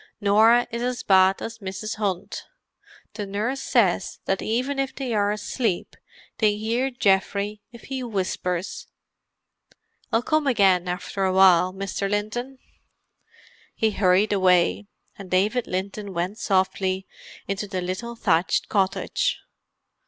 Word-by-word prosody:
Norah 220 +4 +5
is 235 +1 -3
as 250 0 -2
bad 190 0 +4
as 225 0 -6
Mrs. 205 +2 -5
Hunt; 200 -1 -3 0.7
the 205 -2 -5
nurse 225 +7 -2
says 195 -7 +1
that 195 0 0
even 255 +5 -1
if 270 -1 -2
they 260 -4 -3
are 205 -1 +2
asleep 210 -1 -2 0.4
they 210 -2 +3
hear 230 +5 0
Geoffrey 205 -2 0
if 235 - -13
he 265 -1 -5
whispers. 185 -5 -3 1.2
I'll 225 +1 +2
come 310 +1 +1
again 195 -8 +3
after 180 +2 -3
a 190 - +2
while, 185 -1 +5
Mr. 195 +1 -3
Linton." 215 +6 -3 1.2
He 220 -1 +1
hurried 195 +1 +3
away, 185 +1 +3 0.3
and 195 -2 -9
David 210 +7 +1
Linton 195 +1 -4
went 180 +5 -2
softly 190 -1 0 0.4
into 200 +1 -3
the 190 -2 -3
little 185 +7 -4
thatched 180 -6 +1
cottage. 205 - 0
205 Hz, 130 wpm, -24 LUFS, 190-230 Hz, 1.2 s, Norah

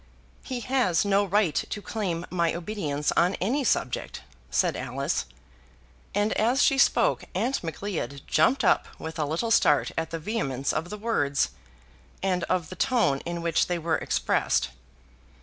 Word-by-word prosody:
"He 250 -2 -5
has 245 -9 +1
no 200 0 +3
right 200 -4 +2
to 210 - -2
claim 185 -5 -3
my 170 -2 +1
obedience 165 -6 -2
on 180 +3 +2
any 255 +10 0
subject," 130 - -1 0.3
said 70 - +1
Alice; - - -2 0.9
and 205 +1 +2
as 240 +6 +2
she 275 - +3
spoke - - +3
Aunt 265 -3 0
Macleod 160 -5 -4
jumped 235 - +3
up 190 - +3
with 160 +1 -7
a 150 - +1
little 165 +10 -1
start 150 -9 +4
at 160 0 -2
the 165 - -3
vehemence 155 - -2
of 175 - -2
the 210 - -5
words, 145 - +1 0.7
and 180 -2 +1
of 180 -4 -1
the - - -6
tone 230 - +2
in 170 0 -3
which 170 -1 +2
they 175 - -1
were 165 -1 0
expressed. - - +1
180 Hz, 155 wpm, -26 LUFS, 160-215 Hz, 0.9 s, start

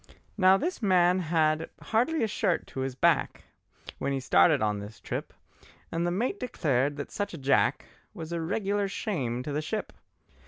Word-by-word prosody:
Now 190 -1 +5
this 345 - -3
man 180 -3 +4
had 160 -2 +1
hardly 245 +7 +1
a - - +2
shirt 180 -5 0
to - - -8
his 130 -1 -2
back, - - +1 0.6
When 140 - -1
he 135 - 0
started 90 -9 +4
on 105 -1 0
this 105 +2 -9
trip, - - -5 0.6
And 170 +1 0
the - - +1
mate 240 - -1
declared 145 - 0
that 145 - -6
such 205 -4 -3
a - - -7
Jack 135 -1 +2 0.3
Was 160 0 -7
a 170 -1 -2
regular 200 +3 -1
shame 135 - -3
to 145 - -5
the 150 +2 -1
ship. 215 +7 -4
165 Hz, 180 wpm, -28 LUFS, 135-200 Hz, 0.6 s, Now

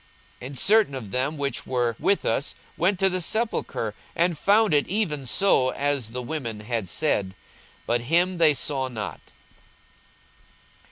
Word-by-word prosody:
42:024:024 125 - -7
And 140 0 -8
certain 210 - +3
of 110 -7 -7
them 135 +5 -1
which 140 -3 -2
were 120 -3 0
with 200 - +1
us 125 +5 -1 0.2
went 185 +4 +1
to 195 - +3
the 185 -1 -1
sepulchre, 215 - -2 0.2
and 170 0 +2
found 200 +5 +3
it 145 -1 +3
even 160 -10 -1
so 135 -6 +3
as 140 -5 0
the 125 +2 -5
women 120 -6 -4
had 110 -4 -2
said: 100 - 0 0.5
but 120 0 0
him 175 +7 +1
they 155 -3 +5
saw 135 -1 -1
not. 110 -5 -7
140 Hz, 155 wpm, -25 LUFS, 120-175 Hz, 0.5 s, they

